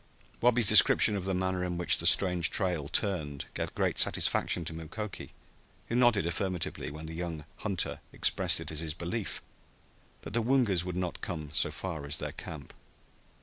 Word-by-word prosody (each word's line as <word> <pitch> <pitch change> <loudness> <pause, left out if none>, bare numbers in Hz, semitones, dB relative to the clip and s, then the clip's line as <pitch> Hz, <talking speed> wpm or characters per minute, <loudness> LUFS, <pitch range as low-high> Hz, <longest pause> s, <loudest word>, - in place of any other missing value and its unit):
Wabi's 120 -1 +4
description 105 - +7
of 95 -2 -3
the 95 -1 -1
manner 95 0 -1
in 90 -1 -3
which 90 - +1
the - - +2
strange 90 -3 +4
trail 90 -7 -1
turned 80 -6 0
gave - - -4
great - - 0
satisfaction 85 - +2
to 80 - -4
Mukoki, 85 +6 -7 0.6
who 115 - -1
nodded 120 -7 +3
affirmatively 90 0 -2
when 75 +2 -8
the 80 - -7
young 80 -3 -5
hunter 100 -5 -2
expressed - - +2
it - - -5
as 75 - -4
his 80 -2 -4
belief 90 +5 -4 0.8
that - - -8
the 115 - +2
Woongas 115 -7 +2
would 90 -1 -5
not 90 -2 -3
come 80 -4 -5
so - - +3
far 85 -6 -6
as 70 +2 +1
their - - -4
camp. 75 -4 -9
90 Hz, 175 wpm, -30 LUFS, 80-100 Hz, 0.8 s, description